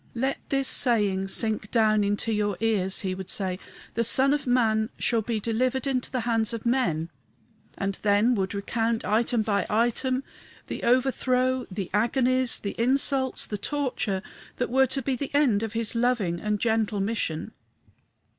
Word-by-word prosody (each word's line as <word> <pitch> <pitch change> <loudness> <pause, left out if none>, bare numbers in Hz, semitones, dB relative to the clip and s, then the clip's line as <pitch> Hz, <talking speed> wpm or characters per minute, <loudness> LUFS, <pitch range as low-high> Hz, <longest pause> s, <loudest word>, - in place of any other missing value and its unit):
"Let 265 +3 -1
this 275 -1 +1
saying 205 -8 +3
sink 215 +1 +1
down 215 -3 +3
into 205 +2 0
your 205 -2 -1
ears," 205 -4 +1
he 190 -2 -2
would 190 -1 -7
say: 185 -2 -2 0.3
"the 230 - 0
Son 265 +4 +4
of 290 -2 -2
man 220 -3 +2
shall 230 -2 0
be 220 0 -2
delivered 250 +5 -1
into 260 -3 -1
the 255 - -2
hands 225 -1 0
of 230 0 -6
men;" 175 -10 0 0.7
and 195 -1 -2
then 210 +4 +3
would 195 -3 -2
recount, 225 +3 -1
item 225 +1 +1
by 200 -3 0
item, 240 +4 +1 0.4
the - - -6
overthrow, 255 0 +1
the 195 -1 -5
agonies, 250 +3 +2
the 200 - -5
insults, 260 +1 +2
the 210 - -5
torture, 245 -8 -2 0.3
that 250 - -2
were 265 +1 +4
to 265 +1 -3
be 265 +1 0
the 275 +2 -4
end 255 -9 +3
of 225 -1 -4
his 225 -1 -1
loving 230 -8 0
and 210 +1 -1
gentle 220 -2 0
mission. 195 -6 -2
225 Hz, 165 wpm, -26 LUFS, 205-255 Hz, 0.7 s, Son